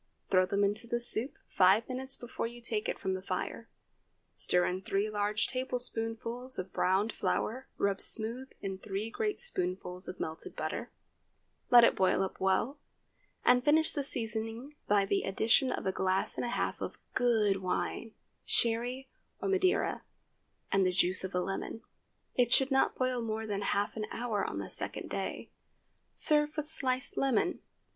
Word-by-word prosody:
Throw 185 -1 +4
them 200 +1 +1
into 210 +4 +1
the 240 0 0
soup 240 +2 +2
five 195 +4 +4
minutes 265 +1 -3
before 240 -1 -4
you 240 +1 -10
take 225 -2 -1
it - - -2
from 190 -2 -2
the 185 - -3
fire; 195 - -4 0.6
stir 180 0 +2
in 185 +1 -2
three 200 +2 -1
large 210 +1 +1
tablespoonfuls 245 -1 -2
of 185 0 -5
browned 195 +4 +1
flour 255 +4 -2
rubbed 200 -1 0
smooth 235 +4 +4
in 195 -1 -4
three 210 +3 -4
great 420 - -2
spoonfuls 180 - -2
of 180 - -7
melted 160 0 -4
butter, - - -4 0.8
let 240 -1 +9
it - - +5
boil 190 0 +3
up 190 - -5
well, 190 +9 +1 0.7
and 250 0 +5
finish 315 +3 +4
the 285 - -1
seasoning 225 +1 -2
by 205 -1 +4
the 195 0 +1
addition 225 +7 +2
of - - -3
a 190 - +2
glass 190 0 0
and - - -2
a - - -2
half - - -2
of - - -5 0.2
good 220 -5 +3
wine—Sherry 230 +6 -1 0.3
or - - -3
Madeira—and 370 - -1
the 185 - +3
juice 180 +1 +2
of 190 0 -4
a - - +2
lemon. 195 +4 -4 0.5
It 245 -1 +2
should 270 +2 +4
not 270 - +3
boil 255 -1 0
more 220 -1 -3
than 205 -2 -2
half 200 0 0
an 215 -1 -3
hour 225 -4 -2
on - - -5
the - - -4
second - - -4
day. - - -4 0.6
Serve 300 0 +2
with 305 0 -2
sliced 260 -4 -2
lemon. 270 - +1
225 Hz, 165 wpm, -31 LUFS, 195-255 Hz, 0.8 s, let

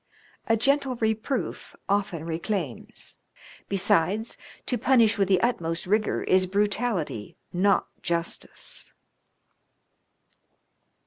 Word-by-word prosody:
A 225 -1 +3
gentle 270 +2 +2
reproof 220 +3 -2
often 195 -5 0
reclaims; 165 - -4 0.5
besides, 195 +3 +2 0.3
to 250 - 0
punish 230 -3 +4
with 195 - +3
the 190 -2 +4
utmost 165 -9 0
rigour 210 +3 +1
is 185 0 +3
brutality, 200 - -1 0.2
not 195 +3 +3 0.2
justice." 170 0 -4
200 Hz, 85 wpm, -26 LUFS, 175-225 Hz, 0.5 s, punish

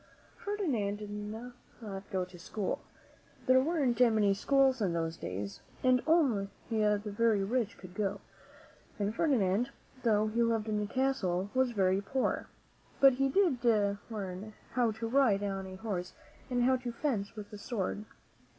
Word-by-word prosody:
Ferdinand 290 - -1
did 205 0 -8
not 215 +4 -6 0.6
go 190 -4 -1
to 180 -1 -14
school. 200 +3 -3 0.6
There 260 0 +6
weren't 275 -6 +1
many 220 -5 +5
schools 265 +4 +3
in 185 -4 +1
those 165 -1 -1
days 100 - -5 0.2
and 255 -1 +4
only 265 -12 +3 0.2
the 210 -2 +3
very 210 0 +2
rich 230 +1 -1
could 185 -1 -11
go; 200 0 -1 0.8
and 205 0 -1
Ferdinand, 230 - +2 0.3
though 215 -3 +3
he 220 +2 0
lived 225 -2 +1
in 210 -1 0
a 205 - -2
castle, 205 -7 0
was 260 -1 +3
very 195 -4 +2
poor. 260 +6 -1 0.5
But 270 -1 +8
he 270 - +3
did 280 -7 +2 0.5
learn 205 -1 -5 0.2
how 245 -3 +2
to 220 +1 -4
ride 225 -5 +3
on 195 -1 -3
a 185 - -8
horse 185 -3 -4 0.4
and 245 -1 +1
how 260 +1 +4
to 250 -1 -5
fence 230 -5 -2
with 210 -1 -9
a 210 - -7
sword. 210 -2 -3
215 Hz, 155 wpm, -32 LUFS, 200-255 Hz, 0.8 s, But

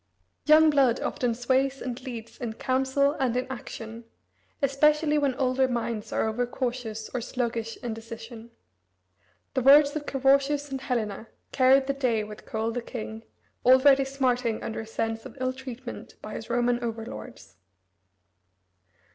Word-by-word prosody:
Young 310 +1 +7
blood 265 -4 +3
often 245 -5 -1
sways 265 +3 +1
and 250 +1 -5
leads 235 -4 -8
in 235 -2 -3
council 265 +4 +1
and 250 -2 +1
in 250 - 0
action, 230 -2 -8 0.5
especially 300 +2 +3
when 280 -3 +1
older 260 0 +2
minds 235 -3 -3
are - - +1
over 240 +3 -1
cautious 240 -4 -4
or 250 - -1
sluggish 230 -2 -3
in 235 -2 -2
decision. 225 +1 -9 1.0
The 260 - +1
words 285 +3 +7
of 300 -1 -4
Carausius 275 +2 +2
and 265 -1 -3
Helena 225 -5 -2 0.2
carried 265 +1 +5
the 275 - 0
day 245 -6 0
with 210 0 -10
Coel 220 +1 -2
the 245 +1 -3
king, 225 -2 -7 0.4
already 265 +2 +6
smarting 250 -4 0
under 220 - -4
a 220 - -6
sense 225 0 -3
of - - -11
ill 255 0 0
treatment 255 -1 -8
by 215 - -8
his 225 - -7
Roman 240 0 +1
over 225 -1 -3
lords. 105 - -10
250 Hz, 150 wpm, -27 LUFS, 225-270 Hz, 1.0 s, Young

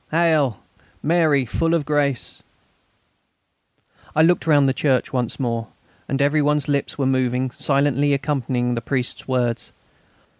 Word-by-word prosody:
Hail! 155 - +2 0.5
Mary, 155 -4 +2
full 165 +7 0
of 155 -4 -1
grace...." 145 -3 -1 1.7
I 155 - +5
looked 165 -3 +2
round 145 -3 +4
the 135 - +2
church 135 -2 0
once 125 -1 -2
more, 115 -3 -2 0.4
and 135 - -1
every 145 +2 +2
one's 150 -1 +1
lips 140 -1 -1
were 140 - 0
moving 130 -1 0
silently 145 +1 +1
accompanying 130 -4 -1
the 115 - -3
priest's 125 -1 -3
words. 125 -3 -1
140 Hz, 135 wpm, -21 LUFS, 125-150 Hz, 1.7 s, I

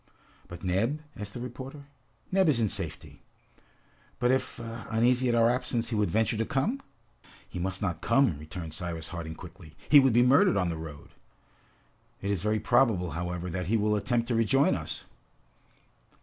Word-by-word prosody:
"But 85 - -10
Neb?" 105 +11 0 0.2
asked 100 -1 -7
the - - -4
reporter. 130 +4 -8 0.5
"Neb 190 -3 +4
is 135 -6 +3
in 110 -3 +2
safety." 95 -7 -5 1.0
"But 125 0 +2
if, 130 - -1
uneasy 120 +2 0
at 120 - +2
our 115 0 +5
absence, 120 -1 0
he 115 - -2
would 105 -3 +1
venture 110 +4 +1
to 115 - +1
come?" 205 - -1 0.7
"He 90 - -7
must 95 +2 -2
not 90 -4 -2
come!" 115 - +3
returned 80 +1 -7
Cyrus 85 -1 -5
Harding 80 -2 -6
quickly. 85 -2 -12
"He 145 - +9
would 135 -3 +4
be 120 +1 +5
murdered 140 +10 +5
on 90 -3 +1
the 80 - -3
road!" 75 -3 -9 1.1
"It 100 - -2
is 100 -4 -1
very 105 +2 +1
probable, 115 -9 +2
however, 90 +2 -3
that 90 0 -3
he 115 +4 +2
will 105 0 +2
attempt 115 +2 0
to - - +1
rejoin 115 +5 +3
us!" - - -4
110 Hz, 175 wpm, -28 LUFS, 90-125 Hz, 1.1 s, He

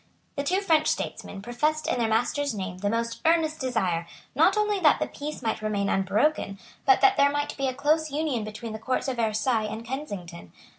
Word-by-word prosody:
The 280 - -1
two 370 +7 +1
French 320 -5 +3
statesmen 195 -1 -3
professed 300 +7 0
in - - 0
their 230 - +2
master's 240 +4 0
name 185 -2 -5
the 205 +1 0
most 230 +1 -2
earnest 320 -1 +2
desire, 190 - -1 0.3
not - - +4
only 420 -1 +1
that 310 -5 +5
the - - +1
peace 300 +1 -7
might 225 -1 -1
remain 205 -2 -1
unbroken, 195 +3 +1 0.3
but 395 - +6
that 400 -1 +5
there 280 0 +5
might 290 0 -2
be 275 -1 -1
a 260 - -2
close 305 +3 +1
union 285 -5 -1
between 215 +1 -6
the 220 - -6
Courts 255 +5 -1
of 260 -2 -2
Versailles 220 0 +1
and 225 +1 -6
Kensington. 200 - -6
250 Hz, 200 wpm, -26 LUFS, 215-305 Hz, 0.3 s, but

